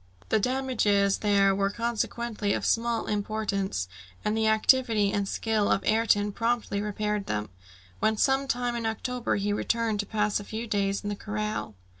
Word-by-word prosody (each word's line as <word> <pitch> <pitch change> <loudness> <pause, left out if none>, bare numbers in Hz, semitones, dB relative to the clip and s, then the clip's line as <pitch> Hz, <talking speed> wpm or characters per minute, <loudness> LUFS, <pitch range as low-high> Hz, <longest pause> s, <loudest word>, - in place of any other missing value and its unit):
The - - +3
damages 215 -5 +1
there 200 -2 +3
were 195 0 +1
consequently 230 -1 -2
of - - -2
small 230 0 +1
importance, 200 - -2 0.4
and 210 - +1
the 220 0 +2
activity 220 -2 +3
and 200 -1 0
skill 215 0 0
of 195 - +1
Ayrton 215 -2 +2
promptly 230 -2 -1
repaired 210 -1 -2
them, 105 -1 -2 0.5
when 220 0 +2
some 270 +4 +2
time 245 -1 -1
in 230 -1 -2
October 245 +2 -2
he 205 0 0
returned 225 0 0
to 205 - -2
pass 210 -1 0
a - - -7
few 220 +3 -5
days 200 -2 0
in 205 - -3
the 205 - -2
corral. 210 - -4
215 Hz, 165 wpm, -27 LUFS, 200-230 Hz, 0.5 s, The